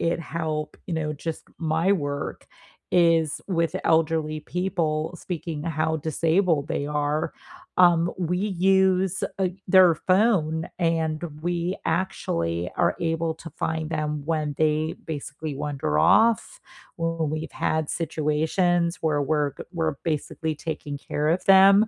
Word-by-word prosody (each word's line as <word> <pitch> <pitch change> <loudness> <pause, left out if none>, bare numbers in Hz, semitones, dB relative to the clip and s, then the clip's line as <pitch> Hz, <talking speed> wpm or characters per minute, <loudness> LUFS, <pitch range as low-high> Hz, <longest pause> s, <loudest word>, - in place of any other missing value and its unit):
it 170 0 +1
help, 155 -2 -3
you 180 - -4
know, 155 -1 -1
just 160 +2 -5 0.2
my 165 +4 +2
work 145 -6 -3 0.4
is 165 -3 +3
with 170 -4 0
elderly 160 -1 +2
people, 170 -2 -1
speaking 165 -3 -5
how 160 -1 -1
disabled 160 0 +1
they 145 - -2
are, 150 +1 -1 0.4
um, 175 -1 +5
we 180 0 0
use, 190 -1 +2 0.2
uh, 190 -2 +2 0.2
their 185 -2 +7
phone, 175 -4 +2
and 165 -2 +1 0.2
we 175 +2 -1
actually 85 - -1 0.2
are - - +2 0.2
able 165 0 -1
to 165 - -10
find 160 -1 -3
them 150 -2 -2
when 155 -2 -1
they 155 0 +1
basically 150 0 -5
wander 140 - -2
off. 220 - +3 0.4
When 165 -2 -1
we've 155 +1 -4 0.2
had 155 -1 0
situations 165 +3 +1
where 150 -3 +1
we're 145 0 +1
g - - -6
we're 160 -4 -1 0.2
basically 155 +1 -3
taking 150 -2 -5
care 150 +1 -2
of 185 - -18
them, 195 +1 +8
160 Hz, 130 wpm, -25 LUFS, 155-175 Hz, 0.4 s, them